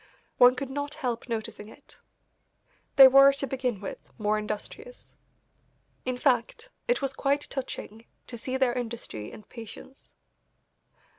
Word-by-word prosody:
One 250 0 +8
could 265 +1 -5
not 285 +2 -4
help 250 -5 -3
noticing 225 -2 -4
it. 220 - -17 1.0
They 270 -1 +11
were, 275 +1 +8
to 275 0 -3
begin 255 -5 -2
with, 195 - -6 0.2
more 215 -1 +1
industrious. 215 - -7 0.9
In 255 -1 -1
fact, 245 -3 0 0.2
it - - +1
was 270 -1 -1
quite 280 +1 0
touching 230 -4 -6 0.2
to 240 - -8
see 255 +3 -3
their 260 -2 +2
industry 235 - -5
and 210 - -13
patience. 230 +3 -12
250 Hz, 135 wpm, -27 LUFS, 225-275 Hz, 1.0 s, They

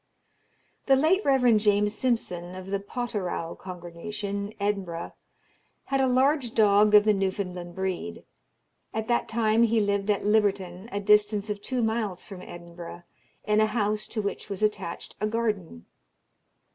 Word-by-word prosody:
The 270 - +6
late 325 +9 +3
Rev. 250 -5 +4
James 210 0 +2
Simpson, 185 -7 -2
of 185 0 -8
the 200 - 0
Potterrow 200 -6 -3
congregation, 195 +3 -6
Edinburgh, 195 -5 -2 0.7
had 270 0 0
a 265 - +3
large 260 -1 +2
dog 210 0 +5
of 210 - +8
the 215 0 +4
Newfoundland 185 -3 -3
breed. 185 - -4 0.7
At 220 0 -2
that 240 - +1
time 225 0 +2
he 230 -1 +4
lived 200 0 0
at 205 -1 +1
Libberton, 200 -2 +1
a 200 - -2
distance 210 0 +3
of 205 -1 -5
two 250 +2 -1
miles 220 -5 -1
from 195 -3 -9
Edinburgh, 170 0 -10 0.4
in 210 0 +2
a 215 - +4
house 215 -1 -1
to 215 -2 -3
which 200 - -4
was 200 +1 -4
attached 210 -5 -1
a 215 - +2
garden. 210 - -2
205 Hz, 145 wpm, -27 LUFS, 190-220 Hz, 0.7 s, of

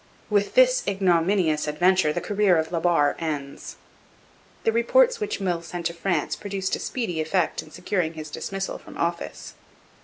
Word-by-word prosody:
With 205 -1 +1
this - - +5
ignominious 175 -4 +2
adventure 175 +2 +3
the - - -2
career 205 -4 +2
of 160 +1 -1
La 170 - 0
Barre 165 -4 +3
ends. 145 -4 -5 0.9
The 225 - +3
reports 470 - +3
which 425 -1 -3
Meulles 175 -3 -2
sent 175 -1 -6
to 170 - 0
France 170 -2 -1
produced 195 -2 -3
a - - -7
speedy 190 -11 -2
effect 165 +2 0
in - - -14
securing 180 -1 -2
his 155 -1 -7
dismissal 195 +4 -4
from - - -12
office. 170 0 -3
180 Hz, 160 wpm, -24 LUFS, 160-200 Hz, 0.9 s, this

